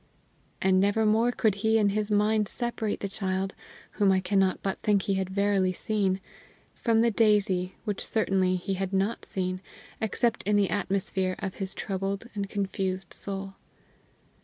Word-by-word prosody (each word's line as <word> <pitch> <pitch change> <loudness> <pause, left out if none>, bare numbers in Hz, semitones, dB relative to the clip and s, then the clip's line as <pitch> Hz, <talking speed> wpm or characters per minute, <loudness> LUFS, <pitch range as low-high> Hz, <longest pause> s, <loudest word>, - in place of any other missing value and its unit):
And 190 0 +4
never 205 +3 +2
more 225 +3 +3
could 220 -4 +2
he 220 0 +3
in 210 -2 +3
his 210 +1 -1
mind 210 0 +2
separate 235 -2 -3
the 200 - -1
child, 190 -1 -2 0.4
whom 200 -2 +3
I 190 - +3
cannot 190 0 +1
but 195 - -2
think 205 -2 +2
he 200 - 0
had 190 -1 -1
verily 195 -1 +2
seen, 195 -1 0 0.5
from 225 -2 +2
the 235 0 +3
daisy 200 -4 +2
which 210 -3 -3
certainly 190 -4 +1
he 185 +2 -2
had 190 0 -3
not 195 +4 0
seen, 185 -1 -3 0.4
except 225 +1 0
in 210 +1 +1
the 200 -4 +2
atmosphere 190 -1 -1
of 195 -2 -4
his 190 0 -4
troubled 195 +1 -3
and 200 -2 -3
confused 190 -2 -2
soul. 195 -1 -2
195 Hz, 160 wpm, -28 LUFS, 190-210 Hz, 0.5 s, And